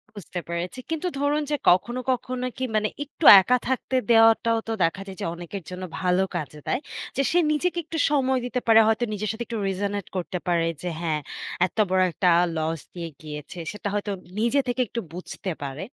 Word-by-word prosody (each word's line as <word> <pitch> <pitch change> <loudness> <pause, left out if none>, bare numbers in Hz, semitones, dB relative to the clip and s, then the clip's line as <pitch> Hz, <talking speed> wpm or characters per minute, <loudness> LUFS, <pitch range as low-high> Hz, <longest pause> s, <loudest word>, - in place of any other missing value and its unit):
বুঝতে 185 -2 -6
পেরেছি। 170 +7 -4
কিন্তু 325 +2 -1
ধরুন 290 +2 +1
যে - - +3
কখনো, 235 +8 +2
কখনো 250 0 -2
কি 260 - -3
মানে 215 0 +2 0.2
একটু 295 +2 -6 0.2
একা 250 +7 +3
থাকতে 260 0 -1 0.2
দেওয়াটাও 225 0 +5
তো - - -2
দেখা 165 +4 0
যায় 190 -1 -8
যে - - -1
অনেকের 175 +2 -7
জন্য 185 0 -6 0.2
ভালো 180 +1 +2
কাজে 150 -2 -4
দেয়। - - +1 0.4
যে - - +3
সে 350 - +4
নিজেকে 350 +4 0
একটু 325 - -5
সময় 265 -3 +2
দিতে 250 0 -1
পারে। 225 -1 +7
হয়তো 220 +2 +2
নিজের 210 0 -2
সাথে 225 +2 -4
একটু 230 - -4
resonate 200 0 -2
করতে 180 +1 -3
পারে 170 -2 +2
যে 180 - -3
হ্যাঁ, 155 -3 -1 0.5
এত - - -24
বড় 185 0 +3
একটা 180 +2 +2 0.3
loss 160 +1 -1 0.2
দিয়ে 170 -2 -5
গিয়েছে 150 +2 -8
সেটা 210 0 -6
হয়তো 205 0 -1 0.3
নিজে 235 +5 +2
থেকে 250 +1 0
একটু 235 +3 -4
বুঝতে 185 +1 -5
পারে। 140 +5 -5
205 Hz, 190 wpm, -25 LUFS, 175-250 Hz, 0.5 s, পারে